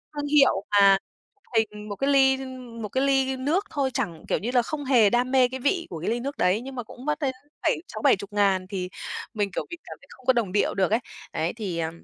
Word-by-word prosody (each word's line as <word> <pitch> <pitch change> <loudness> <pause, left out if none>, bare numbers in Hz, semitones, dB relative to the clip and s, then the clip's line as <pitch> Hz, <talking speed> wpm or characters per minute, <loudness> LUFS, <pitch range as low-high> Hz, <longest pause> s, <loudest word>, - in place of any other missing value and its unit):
thương 290 0 -3
hiệu 275 -9 +4
mà 200 -1 +6 0.6
hình 210 -1 -1
một 205 - -4
cái 275 +5 0
ly 265 -1 +5
ưm, 255 -3 -8
một 210 - -4
cái 260 +6 0
ly 270 -1 +2
nước 315 +10 0
thôi 275 -3 -1
chẳng 180 - -3
kiểu - - +1
như 235 +5 -3
là, 250 -1 +4
không 290 +3 -5
hề 235 -6 +5
đam 245 +3 +1
mê 260 -2 +5
cái 260 +1 -6
vị 335 +6 0
của 165 - -5
cái 175 - -1
ly 235 +1 0
nước 280 +4 -5
đấy, 190 +5 +2
nhưng 265 +1 -8
mà 245 - -4
cũng 245 +4 -12
mất 300 +1 0
đến 270 -3 0 0.3
bảy - - +2
sáu 215 - -7
bảy - - +5
chục 200 +1 -10
ngàn 195 -2 +2
thì 185 -3 -3 0.4
mình, 205 -2 -1
kiểu, - - -3
mình 345 - -7
cảm - - -10
thấy - - -19
không 255 - -16
có 260 - +5
đồng 230 -6 0
điệu 205 - +1
được 195 0 +1
ấy. 225 - +3 0.3
Đấy 160 +2 -1
thì, 200 -7 -4
ờm, 165 +1 -4
240 Hz, 265 wpm, -25 LUFS, 200-265 Hz, 0.6 s, mà